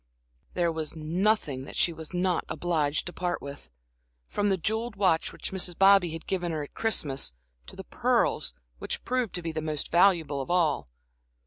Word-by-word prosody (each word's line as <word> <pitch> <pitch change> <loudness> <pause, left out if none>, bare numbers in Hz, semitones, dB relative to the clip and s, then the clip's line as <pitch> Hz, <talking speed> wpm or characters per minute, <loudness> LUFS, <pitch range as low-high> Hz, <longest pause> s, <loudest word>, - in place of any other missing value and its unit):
There 175 -2 +2
was 160 -1 -3
nothing 160 -4 0
that - - -9
she 170 - +2
was 160 -1 -9
not 180 -1 +1
obliged 155 -3 0
to 175 - -6
part 180 -1 -2
with 140 0 -9 0.6
from 205 - 0
the 190 - +2
jeweled 220 +5 -1
watch 185 -5 +2
which - - -6
Mrs. 180 -2 0
Bobby 195 -2 +6
had 165 0 -7
given 175 -3 -1
her 155 -2 -2
at 145 - -11
Christmas, 140 - -1 0.3
to - - -11
the - - -7
pearls, - - +1 0.2
which - - -3
proved 250 -3 -1
to 175 - -4
be 165 - -2
the 155 0 -3
most 155 -1 -3
valuable 170 -6 +4
of 135 - -7
all. 155 - +2
170 Hz, 185 wpm, -28 LUFS, 155-190 Hz, 0.6 s, Bobby